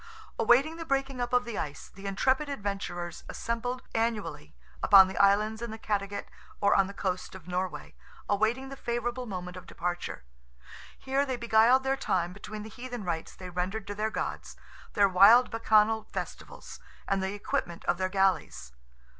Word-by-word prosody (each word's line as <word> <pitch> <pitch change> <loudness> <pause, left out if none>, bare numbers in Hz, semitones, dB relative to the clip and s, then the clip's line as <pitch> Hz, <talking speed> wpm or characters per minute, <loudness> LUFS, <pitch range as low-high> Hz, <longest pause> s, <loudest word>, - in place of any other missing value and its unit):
Awaiting 270 +8 +4
the 330 - -5
breaking 270 -3 -1
up 240 - -2
of 250 0 +3
the 235 -3 -4
ice, 145 -3 -5
the 200 +1 -9
intrepid 260 +9 +1
adventurers 200 -8 -4
assembled 245 +2 -3
annually 210 -10 -2 0.3
upon 195 -2 +8
the 190 - -7
islands 210 +3 +3
in 235 - -4
the 220 - -6
Cattegat 200 -2 -2 0.3
or 200 0 +4
on 195 -1 +4
the 200 - -8
coast 185 -1 -3
of 180 -3 -12
Norway, 180 0 -3 0.3
awaiting 220 +6 +1
the 275 - -7
favourable 240 0 -3
moment 180 -2 -6
of 180 - -11
departure. 175 0 -4 0.7
Here 270 +1 0
they 265 -2 -2
beguiled 235 +3 +4
their 270 0 +1
time 180 -8 -1
between 210 +2 -8
the 220 - -8
heathen 245 -1 -7
rites 165 -3 -4
they 185 -1 -9
rendered 185 +4 -3
to 205 - -5
their 215 +2 -1
gods, - - -4 0.4
their 200 -1 +5
wild 200 +7 +7
bacchanal 220 -1 +3
festivals, - - -7 0.3
and 195 -1 +1
the 190 +1 -2
equipment 175 -4 -3
of 175 - +1
their 185 0 0
galleys. 185 - 0
210 Hz, 170 wpm, -29 LUFS, 190-240 Hz, 0.7 s, upon